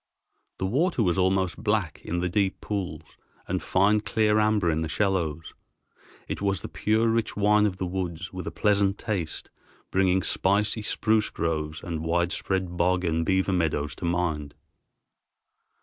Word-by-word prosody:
The - - -2
water 135 - +1
was 90 -1 +1
almost 95 0 +1
black 105 -7 0
in 85 +1 -2
the 90 - 0
deep 95 +1 0
pools 90 -7 -4 0.4
and 95 0 -1
fine 100 +3 +3
clear 110 0 +2
amber 105 -5 +2
in 80 0 -1
the 80 - -2
shallows. 85 -4 -1 0.7
It - - -4
was 100 -3 0
the - - -5
pure, 110 +2 +1
rich 115 -1 0
wine 105 +1 +4
of 95 -2 -4
the 95 - -2
woods 90 -2 -4
with 90 -2 -6
a - - -3
pleasant 100 -2 +2
taste, 95 -8 -4 0.4
bringing 95 -1 +2
spicy 105 +3 +2
spruce 110 0 +1
groves 80 -1 -3
and 80 -2 -4
widespread 85 +2 -1
bog 90 +1 +2
and 80 -1 +1
beaver 95 +2 +1
meadows 80 -4 0
to - - -5
mind. 85 -4 -1
95 Hz, 155 wpm, -26 LUFS, 85-105 Hz, 0.7 s, wine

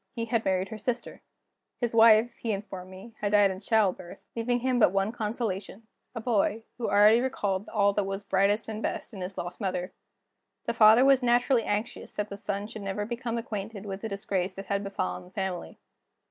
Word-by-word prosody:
He 230 - -2
had 230 -1 0
married 190 0 0
her 220 - -7
sister. 240 +3 -3 0.6
His 240 -2 -1
wife, 225 +1 +6
he 225 -2 -2
informed 190 -2 -6
me, 190 +5 -11
had 205 0 -1
died 205 -2 +5
in 190 - -6
childbirth, 200 -4 0 0.2
leaving 240 +1 0
him 255 -1 +1
but 210 - +5
one 195 +2 +1
consolation 215 -2 -4 0.3
a - - -3
boy, 225 -1 +1 0.2
who 235 - -1
already 210 +3 +6
recalled 205 -6 -2
all 200 -2 +2
that 205 - +1
was 195 +1 -4
brightest 200 +2 +1
and 220 -1 -5
best - - -4
in 195 - -7
his 185 +1 -6
lost 175 +5 -6
mother. 185 -2 -2 0.7
The 235 - -1
father 225 +2 +7
was 270 -1 +5
naturally 245 +1 +3
anxious 210 +3 -3
that 210 0 -2
the 200 - -6
son 200 0 -3
should 215 0 -8
never 200 +1 -3
become 235 +1 -3
acquainted 210 -2 -5
with 195 -1 -5
the 225 - -4
disgrace 195 -2 -2
that 195 - -7
had 200 0 -1
befallen 195 -2 -3
the - - -15
family. 190 -3 -4
210 Hz, 200 wpm, -28 LUFS, 195-230 Hz, 0.7 s, father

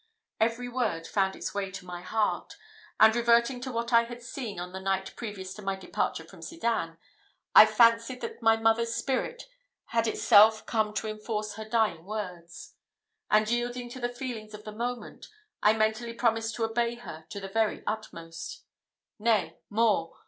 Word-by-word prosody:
Every 230 +2 +1
word 230 -10 -1
found 190 -1 0
its - - -5
way 200 -1 -2
to 190 -1 -9
my 175 -1 -7
heart; 210 +4 -1 0.4
and 220 +1 +7
reverting 235 +1 +3
to 260 +1 -4
what 235 0 -3
I 235 0 +6
had 240 0 -9
seen 235 -5 -6
on 180 +1 -6
the 190 - -6
night 190 0 -1
previous 195 -4 -6
to 210 - -10
my 195 -1 -1
departure 190 - -2
from - - -15
Sedan, 230 - -2 0.6
I 215 - +10
fancied 230 +3 +4
that 455 - -6
my 225 0 +5
mother's 225 +1 +2
spirit 270 - -2 0.5
had 230 0 +1
itself 215 -1 +5
come 215 -2 0
to 220 - -2
enforce 215 0 -4
her 220 +1 -7
dying 215 -8 +1
words; 180 -4 -7 0.6
and, 215 0 +4
yielding 240 +1 -2
to 255 - -8
the 240 -1 -1
feelings 240 -4 -6
of 210 - -11
the 215 - -7
moment, 240 +3 -5 0.3
I 210 - +5
mentally 220 +2 0
promised 225 -1 +1
to 230 - -2
obey 235 +1 0
her 160 -10 -10
to 200 - -6
the 195 - -6
very 220 +2 0
utmost. 170 -6 -6 0.6
Nay, 220 -2 +1
more! 215 -5 +1
220 Hz, 170 wpm, -28 LUFS, 205-235 Hz, 0.6 s, I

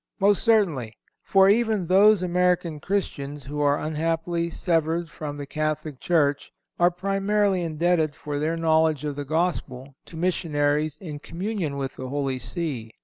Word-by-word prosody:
Most 200 0 +3
certainly; 165 - +2 0.2
for, 195 -1 +4
even 215 -2 +2
those 195 +2 +5
American 180 -3 +1
Christians 145 -6 -3
who 150 +2 -6
are 145 0 +2
unhappily 165 +2 -1
severed 165 -1 0
from 145 -2 -6
the 145 - -5
Catholic 155 -1 -3
Church 145 -5 +1 0.3
are 175 0 +5
primarily 195 +1 0
indebted 165 -1 +1
for 145 -1 -4
their 160 +3 -1
knowledge 160 -2 +2
of 145 -1 -3
the 145 0 -5
Gospel 140 -4 -2
to 165 - -10
missionaries 155 -4 0
in 155 -5 -7
communion 175 -3 -4
with 135 -1 -4
the 130 0 -6
Holy 135 -2 -2
See. 130 -5 -4
160 Hz, 145 wpm, -25 LUFS, 145-180 Hz, 0.3 s, those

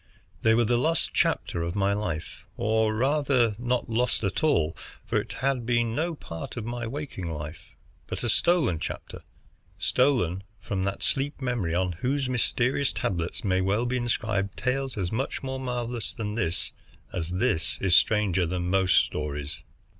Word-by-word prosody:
They 110 0 +5
were 120 0 +4
the 120 +2 +2
lost 165 +5 +1
chapter 85 - +1
of 85 +2 -2
my 100 0 +2
life; 90 -6 -4
or 110 0 +2
rather, 130 -3 +2
not 125 0 0
lost 115 +1 +1
at 100 - -1
all, 85 - +3 0.3
for - - +1
it - - -8
had 130 0 0
been 120 -1 +1
no 165 +6 -1
part 85 - -7
of 115 - -3
my 120 0 -3
waking 125 - -5
life, 75 +1 -7 0.3
but - - -4
a 120 - 0
stolen 145 - +3
chapter, - - -6 0.6
stolen 120 - +2 0.2
from 95 -1 -2
that 100 0 -2
sleep 145 +2 0
memory 120 -11 -1
on 90 0 +1
whose 130 - -1
mysterious 130 +2 +2
tablets 85 -2 -2
may 95 -2 +2
well 100 +5 +1
be 125 +1 0
inscribed 110 -5 -1
tales 130 -1 -1
as 90 -3 -1
much 130 +5 -2
more 130 0 -3
marvelous 120 -3 -3
than 105 -4 -3
this 90 -7 +1 0.4
as 85 -2 -2
this 90 -2 +1
is 95 -3 +4
stranger 95 -5 +4
than 90 +1 -2
most 95 -1 +3
stories. 75 -1 -4
110 Hz, 165 wpm, -27 LUFS, 95-125 Hz, 0.6 s, They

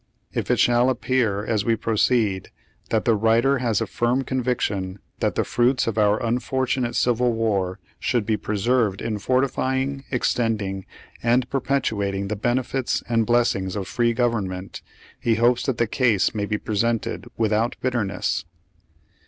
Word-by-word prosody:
If - - -2
it - - +3
shall 120 +1 +4
appear 120 -5 0
as 110 -3 0
we 115 +1 +2
proceed 110 -3 +1 0.4
that 110 -2 0
the 115 - +4
writer 115 +5 +3
has 115 -5 0
a - - +1
firm 120 +3 0
conviction 115 -8 -1 0.2
that - - 0
the - - +1
fruits 125 +2 +2
of 115 -1 -1
our 105 0 +4
unfortunate 125 +1 -1
civil 120 0 +2
war 100 -5 0 0.2
should 120 -4 0
be 110 0 +1
preserved 105 0 0
in 110 -2 -3
fortifying, 130 +2 0
ex 125 - +1
tending 105 -5 -2 0.4
and 120 +1 +2
perpetuating 100 -8 -1
the 105 - -1
benefits 125 +4 -1
and 115 -2 +1
bless 120 0 +3
ings 95 -1 -4
of 100 -2 -3
free 120 -1 +1
government, 100 -6 -2 0.4
he 115 - +1
hopes 120 +3 +2
that 130 -4 0
the 120 - +2
case 110 -3 +2
may 105 -2 -2
be 105 - -1
presented 115 +2 -1
without 110 +2 +1
bitterness. 120 -6 -1
115 Hz, 150 wpm, -23 LUFS, 105-125 Hz, 0.4 s, shall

